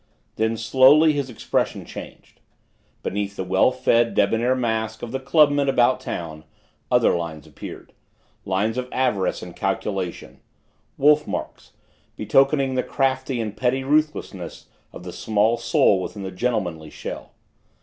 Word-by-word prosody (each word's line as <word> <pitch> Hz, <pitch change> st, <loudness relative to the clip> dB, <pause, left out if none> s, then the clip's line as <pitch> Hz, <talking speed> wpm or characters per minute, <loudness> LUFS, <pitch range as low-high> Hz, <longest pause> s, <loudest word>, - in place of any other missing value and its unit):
Then, 110 Hz, +1 st, 0 dB
slowly, 135 Hz, +7 st, +5 dB
his 140 Hz, -3 st, -2 dB
expression 120 Hz, -, -2 dB
changed. -, -, -11 dB, 0.6 s
Beneath 100 Hz, 0 st, -3 dB
the 95 Hz, -, -3 dB
well 95 Hz, +5 st, +3 dB
fed, 120 Hz, -2 st, +2 dB
debonair 115 Hz, +5 st, +2 dB
mask 110 Hz, -3 st, -2 dB
of 120 Hz, -, -5 dB
the 135 Hz, -, -2 dB
clubman 145 Hz, 0 st, +3 dB
about 125 Hz, -1 st, +3 dB
town, 80 Hz, -2 st, -6 dB, 0.5 s
other -, -, +4 dB
lines 80 Hz, -4 st, -5 dB
appeared -, -, -10 dB, 0.5 s
lines 105 Hz, +6 st, -1 dB
of 125 Hz, 0 st, -5 dB
avarice 125 Hz, -7 st, 0 dB
and -, -, -10 dB
calculation 95 Hz, -4 st, -3 dB, 0.6 s
wolf 150 Hz, +2 st, +4 dB
marks, -, -, -6 dB, 0.4 s
betokening 135 Hz, 0 st, +2 dB
the 130 Hz, -, +1 dB
craft 135 Hz, 0 st, -1 dB
and 115 Hz, -5 st, -3 dB
petty 130 Hz, +1 st, 0 dB
ruthlessness 150 Hz, +2 st, -1 dB, 0.3 s
of -, -, -11 dB
the 90 Hz, -1 st, -8 dB
small 110 Hz, +1 st, +1 dB
soul 115 Hz, -4 st, +3 dB
within 100 Hz, +2 st, -6 dB
the 95 Hz, -, -5 dB
gentlemanly 90 Hz, -7 st, -2 dB
shell. -, -, -8 dB
115 Hz, 135 wpm, -23 LUFS, 100-135 Hz, 0.6 s, slowly